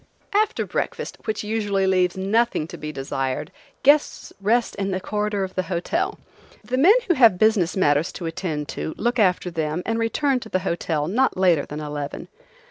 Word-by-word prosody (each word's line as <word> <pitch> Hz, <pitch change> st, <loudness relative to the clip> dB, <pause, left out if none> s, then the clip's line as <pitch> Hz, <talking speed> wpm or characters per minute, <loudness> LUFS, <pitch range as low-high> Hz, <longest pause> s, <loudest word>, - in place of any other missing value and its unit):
After 425 Hz, +1 st, +1 dB
breakfast, -, -, -4 dB
which 215 Hz, -1 st, -2 dB
usually 205 Hz, -3 st, 0 dB
leaves 185 Hz, -1 st, +2 dB
nothing 200 Hz, -3 st, +1 dB
to -, -, -7 dB
be 150 Hz, 0 st, -6 dB
desired, 135 Hz, 0 st, -3 dB, 0.3 s
guests 290 Hz, +2 st, +3 dB
rest 230 Hz, +4 st, +2 dB
in 195 Hz, 0 st, -1 dB
the 185 Hz, -1 st, -1 dB
corridor 210 Hz, +1 st, -2 dB
of 190 Hz, 0 st, -5 dB
the 185 Hz, -, 0 dB
hotel; 195 Hz, -, -1 dB, 0.5 s
the 250 Hz, -, -2 dB
men 370 Hz, -, +7 dB
who 350 Hz, -, +4 dB
have 230 Hz, -, +5 dB
business 200 Hz, -4 st, +2 dB
matters 145 Hz, -2 st, +2 dB
to 175 Hz, -, -6 dB
attend 160 Hz, -3 st, -3 dB
to 160 Hz, -, -4 dB
look 240 Hz, +2 st, 0 dB
after 180 Hz, -3 st, +2 dB
them 160 Hz, +1 st, -2 dB
and 225 Hz, 0 st, -1 dB
return 260 Hz, +4 st, +1 dB
to 225 Hz, -, -10 dB
the 185 Hz, -, 0 dB
hotel 160 Hz, -4 st, -1 dB
not 250 Hz, +7 st, +1 dB
later 175 Hz, -6 st, +3 dB
than 150 Hz, +1 st, -6 dB
eleven. 145 Hz, -1 st, -5 dB
190 Hz, 180 wpm, -23 LUFS, 165-225 Hz, 0.5 s, men